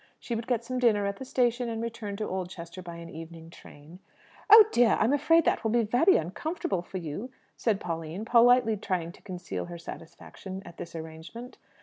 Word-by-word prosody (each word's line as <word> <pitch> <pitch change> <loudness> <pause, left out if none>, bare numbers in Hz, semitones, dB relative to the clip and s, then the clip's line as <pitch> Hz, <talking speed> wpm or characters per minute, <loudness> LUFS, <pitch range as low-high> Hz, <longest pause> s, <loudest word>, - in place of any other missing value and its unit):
She 240 - -5
would 225 0 -3
get 235 -2 0
some 255 +1 -3
dinner 215 -5 +3
at 200 0 -2
the 265 - -7
station, 245 -1 +1
and 225 -1 -3
return 225 -3 -5
to 215 +1 -3
Oldchester 185 -1 -6
by 170 -1 -8
an 170 0 -9
evening 165 +1 -10
train. 160 +2 -14 0.5
"Oh 430 +1 +11
dear, 240 -2 +4
I'm 230 +6 +3
afraid 330 +3 +4
that - - +1
will 225 - +1
be 235 +1 +3
very 245 - +4
uncomfortable 190 - -3
for 185 +2 -7
you!" 175 - -5 0.3
said 215 -4 0
Pauline, 165 +4 -5
politely 235 -1 +5
trying 175 -3 -2
to - - -18
conceal 180 -2 -5
her 175 0 -8
satisfaction 185 +3 -9
at 170 - -12
this 170 - -8
arrangement. 160 +10 -9
200 Hz, 195 wpm, -28 LUFS, 170-240 Hz, 0.5 s, Oh